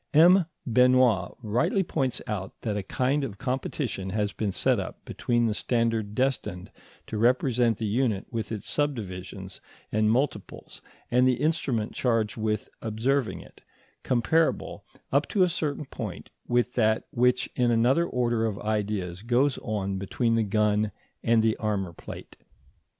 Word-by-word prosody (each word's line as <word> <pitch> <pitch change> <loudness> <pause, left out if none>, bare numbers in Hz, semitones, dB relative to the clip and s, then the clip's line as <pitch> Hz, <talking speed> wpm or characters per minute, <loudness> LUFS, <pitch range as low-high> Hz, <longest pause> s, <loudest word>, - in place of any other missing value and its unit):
M. 175 +3 +7 0.2
Benoit 125 -4 +4
rightly 160 - +1
points 135 -7 -2
out 100 -5 -5
that 110 -3 -2
a 105 - -1
kind 130 +8 0
of 110 -7 -5
competition 125 -6 -3
has 105 +1 -1
been 105 -3 -2
set - - +2
up - - -7
between 120 -1 0
the 110 - +1
standard 115 -2 0
destined 110 -8 -1 0.3
to 110 - -4
represent 120 -1 +3
the 110 - -3
unit 110 -2 0
with 115 -2 -3
its 105 -3 -5
subdivisions 95 -9 -3 0.3
and 110 0 +2
multiples 130 +5 -2 0.3
and 125 +1 +4
the 130 - +4
instrument 135 -6 -1
charged 115 -4 0
with 110 -1 -1
observing 115 -1 0
it, - - -17 0.4
comparable, 160 +6 +1 0.3
up - - +2
to 200 -4 +3
a - - +4
certain 150 -3 -2
point, - - -7 0.2
with 120 0 +1
that 110 -2 +2
which 125 +1 +2
in 125 -1 +2
another 125 +9 +3
order 120 -2 +1
of 105 -2 -3
ideas 105 -4 -2
goes 125 +5 +2
on 100 -2 -2
between 115 +4 0
the 115 - +3
gun 105 0 +1 0.3
and 115 -1 +3
the 110 -1 +3
armour 100 -5 -2
plate. - - -10
115 Hz, 150 wpm, -27 LUFS, 105-130 Hz, 0.4 s, M